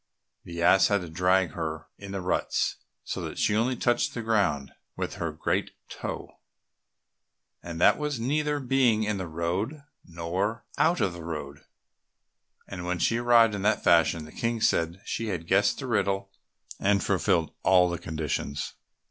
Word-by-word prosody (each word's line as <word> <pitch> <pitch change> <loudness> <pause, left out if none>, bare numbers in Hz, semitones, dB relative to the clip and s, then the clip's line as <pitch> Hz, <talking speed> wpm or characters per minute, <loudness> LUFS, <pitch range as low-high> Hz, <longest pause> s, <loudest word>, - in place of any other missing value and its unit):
The 85 -1 -5
ass 95 +2 +6
had 100 -2 +1
also 90 - -7
to - - -14
drag 90 -1 +2
her 80 -1 -4
in 100 -1 -8
the 100 -1 -3
ruts, 90 - 0 0.3
so - - -4
that - - -6
she 105 - +2
only 120 +4 +1
touched 120 0 +1
the 115 - -3
ground 100 -12 +1 0.2
with - - -4
her 85 -1 -1
great 75 - -2
toe, - - -7 1.2
and 85 -1 -7
that - - +5
was 150 -4 -2
neither 150 +4 0
being 125 -4 +2
in 105 -2 -1
the 95 - -4
road 90 - -2 0.2
nor 90 +6 -3
out 170 +2 +3
of 95 - +1
the 85 -1 -9
road. 75 -4 -6 1.0
And 90 -3 -6
when 90 0 -1
she 115 +7 +1
arrived 120 -2 +5
in 100 - -3
that 105 +2 +1
fashion, 85 -1 +4
the 75 - -12
King 115 +4 -2
said 85 -3 +1
she 115 - -3
had 90 -5 -3
guessed - - +3
the - - -5
riddle 100 0 0 0.5
and 100 0 +2
fulfilled 90 -4 +1
all 90 -1 +5
the 85 -1 -3
conditions. 75 -3 -3
95 Hz, 170 wpm, -27 LUFS, 85-115 Hz, 1.2 s, ass